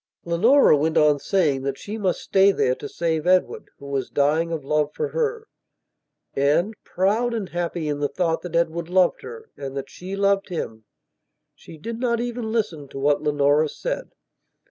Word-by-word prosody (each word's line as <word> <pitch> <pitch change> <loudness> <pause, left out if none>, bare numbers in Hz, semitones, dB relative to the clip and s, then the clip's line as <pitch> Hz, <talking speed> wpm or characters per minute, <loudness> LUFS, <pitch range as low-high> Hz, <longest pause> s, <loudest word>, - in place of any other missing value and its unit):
Leonora 205 - +5
went 155 +2 0
on 150 -1 +4
saying 150 -7 +1
that 135 0 -3
she 210 - -7
must 195 -5 -1
stay 195 +1 +4
there 125 -9 +1
to - - -7
save 165 -1 -1
Edward, 185 0 +2
who 140 - -13
was 140 -2 -3
dying 155 +4 +1
of 155 -4 -4
love 150 0 +1
for 455 - -2
her. 455 -1 -2 0.9
And, 150 +9 +2
proud 220 +6 0
and 205 -5 -4
happy 170 -2 -3
in 145 -1 -2
the 145 -1 0
thought 165 -3 -1
that 175 -2 -6
Edward 170 0 0
loved 180 -1 +3
her, 460 -1 -10
and 135 0 -6
that 135 - -6
she 185 +2 -7
loved 200 0 +1
him, 110 -11 -5 0.7
she 160 - -14
did 230 +8 -6
not 235 -2 0
even 240 -2 -3
listen 175 -11 -2
to 135 - -10
what 145 +1 +2
Leonora 145 0 +2
said. - - -4
170 Hz, 180 wpm, -23 LUFS, 145-210 Hz, 0.9 s, Leonora